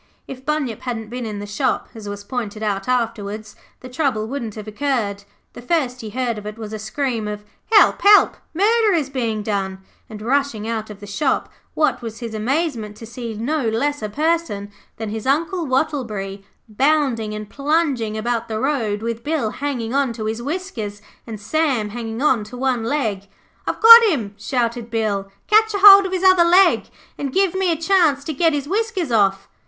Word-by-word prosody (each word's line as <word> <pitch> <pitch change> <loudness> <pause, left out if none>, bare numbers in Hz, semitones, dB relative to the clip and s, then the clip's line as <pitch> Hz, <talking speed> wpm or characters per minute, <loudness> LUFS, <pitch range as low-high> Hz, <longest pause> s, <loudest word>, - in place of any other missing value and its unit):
If 260 -1 -9
Bunyip 270 -6 -2
hadn't 225 -4 -5
been 245 -1 -4
in 210 -1 -5
the 205 - -6
shop, 225 +6 -1
as 215 -3 -8
was 205 0 -7
pointed 215 -2 -5
out 200 -2 -2
afterwards, 220 -4 -2 0.3
the 255 - -9
trouble 250 -5 -1
wouldn't 235 -4 -5
have 215 -1 -8
occurred. 215 -4 -2 0.3
The - - -10
first 255 -2 -1
he 220 - -6
heard 235 -1 -2
of 210 - -9
it 210 +1 -7
was 220 -1 -7
a 215 - -4
scream 225 0 -2
of 210 0 -5 0.3
'Help, 425 - +5
help, 410 0 +6
murder 425 +4 +3
is 285 -5 -1
being 225 -5 -2
done!' 195 -3 -2 0.3
and 215 -1 -8
rushing 255 -3 0
out 220 -1 -3
of 205 -1 -10
the - - -8
shop, 235 +8 -1 0.3
what 305 -4 +1
was 225 -2 -7
his 230 -3 -6
amazement 230 -2 -2
to 225 - -9
see 230 -1 -7
no 275 +7 -1
less 285 +6 -1
a 215 - -3
person 300 -7 -1 0.3
than 220 -2 -4
his 220 +3 -5
Uncle 330 +4 0
Wattleberry 230 -8 -2 0.2
bounding 245 -3 +1
and 210 0 -6
plunging 280 -7 0
about 235 +1 -2
the 220 -1 -3
road 225 -7 -1
with 230 0 -4
Bill 290 -8 -1
hanging 260 -5 -3
on 275 -3 +1
to 220 -2 -6
his 220 +2 -3
whiskers, 240 - -5 0.2
and 220 -2 -7
Sam 250 -1 0
hanging 225 +2 -5
on 255 -7 +3
to 245 +4 -10
one 255 -3 0
leg. 225 -7 -2 0.4
'I've - - -2
got 460 +1 +11
him,' 245 - 0
shouted 235 +1 -2
Bill. 210 -4 -1 0.2
'Catch 435 0 +3
a 400 - -2
hold 395 -1 +10
of - - -8
his 375 0 -2
other 370 -2 +6
leg 360 +3 +4 0.3
and 280 -2 -3
give 385 +3 +2
me 380 -2 +1
a - - +1
chance 325 -4 +2
to 315 - -4
get 325 +3 +2
his 285 -1 -2
whiskers 395 - -1
off.' 195 -3 +2
240 Hz, 190 wpm, -20 LUFS, 215-295 Hz, 0.4 s, got